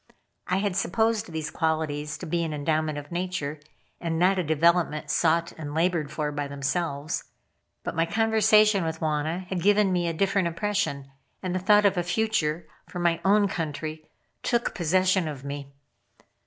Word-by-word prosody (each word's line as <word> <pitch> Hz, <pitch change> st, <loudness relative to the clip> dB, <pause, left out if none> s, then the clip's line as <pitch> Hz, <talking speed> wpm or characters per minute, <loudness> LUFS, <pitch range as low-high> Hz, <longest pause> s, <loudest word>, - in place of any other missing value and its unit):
I 185 Hz, -, +1 dB
had 200 Hz, -2 st, -1 dB
supposed 220 Hz, +1 st, 0 dB
these 160 Hz, -2 st, -4 dB
qualities 150 Hz, -3 st, -1 dB
to -, -, -7 dB
be 170 Hz, +2 st, 0 dB
an 155 Hz, -2 st, -3 dB
endowment 155 Hz, 0 st, 0 dB
of 145 Hz, +1 st, -8 dB
nature, 175 Hz, -4 st, -3 dB, 0.4 s
and 165 Hz, -1 st, -2 dB
not 185 Hz, +3 st, +3 dB
a -, -, +1 dB
development 160 Hz, 0 st, +2 dB
sought 170 Hz, 0 st, +2 dB
and 145 Hz, -1 st, -5 dB
labored 165 Hz, -3 st, +1 dB
for 150 Hz, -1 st, -2 dB
by 145 Hz, -1 st, -3 dB
themselves. 140 Hz, +1 st, -2 dB, 0.6 s
But -, -, -3 dB
my 165 Hz, +1 st, +1 dB
conversation 215 Hz, 0 st, +4 dB
with 160 Hz, -1 st, -3 dB
Wauna 160 Hz, +3 st, -1 dB
had 185 Hz, -2 st, -2 dB
given 205 Hz, 0 st, +4 dB
me 175 Hz, -1 st, +1 dB
a 165 Hz, -, -1 dB
different 195 Hz, +1 st, +1 dB
impression, 170 Hz, -6 st, -2 dB, 0.3 s
and 185 Hz, -1 st, -2 dB
the 185 Hz, -, 0 dB
thought 210 Hz, +3 st, +4 dB
of 195 Hz, -2 st, +3 dB
a 175 Hz, -, +1 dB
future 170 Hz, -5 st, 0 dB, 0.2 s
for -, -, -8 dB
my 170 Hz, -1 st, +1 dB
own 205 Hz, +1 st, +4 dB
country 155 Hz, -3 st, -4 dB, 0.4 s
took 235 Hz, -1 st, 0 dB
possession 185 Hz, +1 st, +2 dB
of 140 Hz, -3 st, -6 dB
me. 140 Hz, 0 st, -6 dB
170 Hz, 170 wpm, -26 LUFS, 155-190 Hz, 0.6 s, conversation